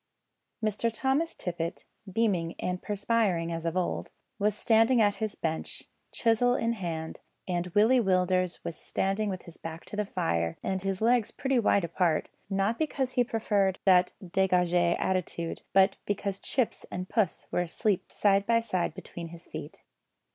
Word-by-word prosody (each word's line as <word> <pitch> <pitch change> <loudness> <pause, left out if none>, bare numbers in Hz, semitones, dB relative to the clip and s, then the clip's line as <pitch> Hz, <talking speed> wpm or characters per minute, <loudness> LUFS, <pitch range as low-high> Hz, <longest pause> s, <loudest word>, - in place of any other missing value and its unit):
Mr 215 +2 0
Thomas 270 +8 0
Tippet, 170 -1 -4 0.3
beaming 185 -6 +1
and 180 0 -3
perspiring 205 -5 0
as 165 0 -3
of 165 +2 -1
old, 180 - -1 0.3
was 205 0 +2
standing 225 +2 +4
at 205 -2 +3
his 215 -2 -2
bench, 160 -1 -3 0.3
chisel 245 +2 +3
in 230 -1 +1
hand, 165 -6 -4 0.3
and 175 -1 -1
Willie 225 +5 +5
Willders 185 -2 +1
was 170 - -4
standing 200 +2 -1
with 185 -2 -4
his 170 - -12
back 165 +1 -7
to - - -8
the 210 -1 -1
fire, 85 - -1
and 190 -1 -1
his 195 0 -2
legs 235 -1 +3
pretty 265 -2 0
wide 200 -3 +3
apart; 170 -1 +1 0.2
not 195 +3 0
because 275 -4 -1
he 250 -1 +3
preferred 205 -5 +1
that 180 -2 +5 0.2
degage 180 -1 +2 0.2
attitude, 175 -3 -1
but 195 0 +4
because 200 -1 -2
Chips 255 -4 -1
and 180 +1 -4
Puss 205 -5 0
were - - +1
asleep 180 +3 -1
side 200 -1 +2
by 230 0 +4
side 185 -8 -1
between 175 -2 -7
his 165 0 -11
feet. - - -9
195 Hz, 160 wpm, -29 LUFS, 175-220 Hz, 0.3 s, Willie